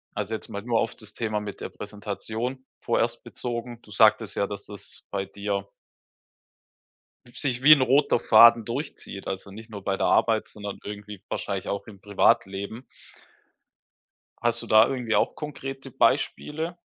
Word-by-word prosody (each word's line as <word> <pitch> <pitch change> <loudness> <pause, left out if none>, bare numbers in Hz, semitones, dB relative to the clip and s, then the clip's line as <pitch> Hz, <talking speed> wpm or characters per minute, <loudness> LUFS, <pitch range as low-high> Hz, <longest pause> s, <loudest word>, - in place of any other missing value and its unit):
Also, 105 +1 -3
jetzt 110 - -5
mal 100 -1 -5
nur 115 -1 +1
auf 115 - -1
das 110 - -10
Thema 110 -2 -2
mit 105 -1 -7
der - - -4
Präsentation 110 +5 -5 0.2
vorerst - - 0
bezogen. 120 -1 -4
Du 105 - -16
sagtest 110 +1 +4
ja: 100 - 0
„Dass 100 -1 -7
das 100 -1 -12
bei 100 -1 -2
dir" 100 0 -3 1.7
„sich 125 -2 -2
wie 155 +2 +11
'n 140 - +4
roter 135 0 +3
Faden 115 +1 +7
durchzieht, 120 -4 -6
also, 95 +1 -5
nicht 110 +3 -11
nur 100 -2 -8
bei 95 0 -1
der - - 0
Arbeit, 110 -2 +3
sondern 105 -1 -7
irgendwie 105 -1 -8
wahrscheinlich 100 -2 -3
auch 100 - -3
im 100 -3 -12
Privatleben“. 100 +3 +1 1.6
Hast 120 0 +2
du - - -9
da 110 +1 +7
irgendwie 125 -4 -1
auch - - +1
konkrete 135 -2 -7
Beispiele? 150 +5 0
110 Hz, 155 wpm, -26 LUFS, 100-120 Hz, 1.7 s, wie